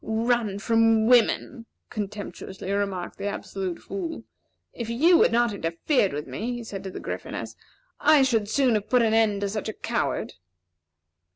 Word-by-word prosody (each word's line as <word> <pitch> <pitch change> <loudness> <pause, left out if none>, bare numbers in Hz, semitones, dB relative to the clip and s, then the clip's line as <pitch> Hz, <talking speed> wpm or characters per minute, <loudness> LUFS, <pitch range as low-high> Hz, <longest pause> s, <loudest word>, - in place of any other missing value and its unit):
"Run 225 -2 0
from 225 0 +3
women!" 240 0 +2 0.2
contemptuously 200 -2 -6
remarked 200 -3 -2
the 200 - -2
Absolute 190 -3 -4
Fool. 340 -4 -6 0.5
"If 235 -2 -5
you 325 +9 +5
had - - +5
not 235 -1 +2
interfered 195 - 0
with 150 +1 -4
me," 215 - -4
he 240 -1 -5
said 195 -3 -7
to - - -3
the - - -7
Gryphoness, - - -6 0.4
"I 295 -3 +5
should 225 -6 +1
soon 260 0 +3
have 210 -2 -1
put 250 -2 +4
an 220 -1 +2
end 215 -3 +2
to 200 - -1
such 210 +1 -3
a - - -4
coward." - - -2
220 Hz, 165 wpm, -25 LUFS, 200-240 Hz, 0.5 s, you